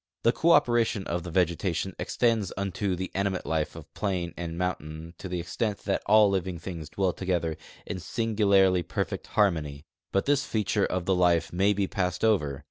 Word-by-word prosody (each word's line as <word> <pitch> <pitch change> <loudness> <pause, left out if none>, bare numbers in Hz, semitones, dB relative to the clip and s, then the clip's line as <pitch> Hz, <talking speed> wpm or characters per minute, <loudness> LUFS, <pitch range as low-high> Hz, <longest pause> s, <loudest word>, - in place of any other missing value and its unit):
The 115 - +5
cooperation 120 - +3
of 85 +1 -2
the 85 - -7
vegetation 90 +1 0
extends 115 -5 +1
unto 100 0 -1
the 95 +1 -5
animate 100 -1 -1
life 80 -2 -1
of - - -11
plain 90 -4 -2
and 85 -1 -5
moun 90 0 0
tain 80 +2 -9
to 95 - -6
the 90 0 -2
extent 100 +5 -2
that 100 - 0
all 105 0 +7
living 95 -2 -1
things 85 -3 -7
dwell 95 0 0
together 85 -4 -1 0.3
in 90 - -4
singu 110 +5 -3
larl}'' 95 -4 +4
perfect - - -3
harmony; 80 -9 0 0.3
but 95 - +1
this 140 -1 +2
feature 105 -3 0
of 90 -1 -2
the 95 - +2
life 90 -2 +2
may 95 +3 +3
be 100 -1 +1
passed 90 +1 -1
over. 75 -11 +1
95 Hz, 185 wpm, -27 LUFS, 85-100 Hz, 0.3 s, all